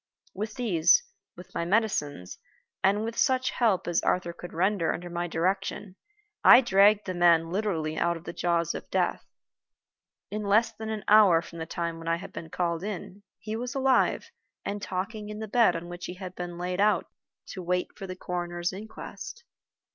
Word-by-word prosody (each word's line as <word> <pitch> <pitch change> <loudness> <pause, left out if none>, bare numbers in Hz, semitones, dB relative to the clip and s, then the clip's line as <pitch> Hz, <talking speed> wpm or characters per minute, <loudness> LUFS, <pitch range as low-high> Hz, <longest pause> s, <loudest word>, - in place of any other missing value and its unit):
With 215 +1 -5
these, 180 -10 +4 0.3
with 180 +2 -13
my - - -1
medicines, 170 - -1 0.4
and 200 +2 +3
with 230 +1 -4
such 260 +1 +2
help 220 -7 +1
as 175 -1 +1
Arthur 175 -1 0
could 175 +1 -9
render 185 0 +1
under 175 +1 -5
my 175 0 -2
direction, 190 +3 -2 0.5
I 245 - +9
dragged 205 -2 +4
the 185 - -3
man 170 -2 +4
literally 170 -6 -1
out 170 0 +1
of 165 - -13
the - - -6
jaws 170 -2 0
of - - -7
death. - - 0 1.1
In 210 +1 -3
less 210 +3 +3
than 220 0 -7
an 215 -1 -4
hour 200 -6 +6
from 170 0 -10
the 160 - -5
time 170 0 -3
when 165 - -9
I 165 - +2
had 170 - -9
been 160 - -7
called 170 0 -1
in, 200 -1 -6 0.2
he 215 0 -5
was 245 +4 -4
alive 265 -1 +2 0.3
and 205 0 -3
talking 210 +3 -4
in 210 - -6
the 220 0 -5
bed 230 +2 +4
on 165 +1 -5
which 175 0 -7
he 180 - -6
had 185 -1 -7
been 175 -1 -6
laid 180 +2 -2
out 205 -3 +3 0.4
to 185 - -6
wait 180 +1 -1
for 195 - -7
the 185 - -6
coroner's 175 -1 -3
inquest. 390 - -9
185 Hz, 185 wpm, -28 LUFS, 170-210 Hz, 1.1 s, I